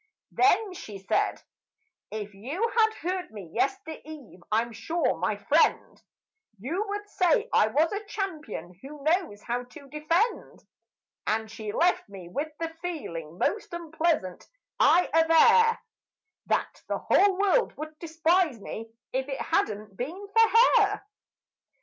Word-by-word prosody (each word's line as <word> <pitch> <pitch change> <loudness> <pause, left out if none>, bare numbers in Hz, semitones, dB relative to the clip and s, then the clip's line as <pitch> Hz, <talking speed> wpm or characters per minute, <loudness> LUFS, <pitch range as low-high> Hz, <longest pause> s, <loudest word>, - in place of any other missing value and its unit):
Then 405 +1 +3
she 210 - -8
said, 195 - -1 0.7
"If 210 -1 -6
you 295 - -2
had 440 -1 +4
heard 365 +1 -2
me 200 -7 -10
yestereve, 310 - -4
I'm 230 +2 +1
sure, 255 - -1
my 205 +4 0
friend, 300 +10 +1 0.6
You 310 - -2
would 410 +1 -4
say 415 +4 +2
I - - +5
am 220 - -6
a 370 +7 +2
champion 310 - -5
who 285 +1 -10
knows 315 - 0
how 245 +1 -2
to 280 +3 -14
defend." 330 - -1 0.6
And 220 0 -1
she 220 -1 -6
left 340 - +1
me 190 -3 -10
with 290 - -3
the 330 -1 -2
feeling 170 - -5
most 405 - -1
unpleasant, 320 - -1 0.3
I 360 +1 +5
aver 455 +9 +6 0.7
That - - -1
the - - -1
whole 395 -2 +3
world 405 +5 +2
would 310 +1 -8
despise 330 -4 +1
me 225 +2 -7 0.2
if 265 +1 -1
it 270 - -3
had - - +1
not 210 -1 -8
been 340 - -5
for 455 +2 +6
her. 410 0 -2
315 Hz, 135 wpm, -27 LUFS, -, 0.7 s, aver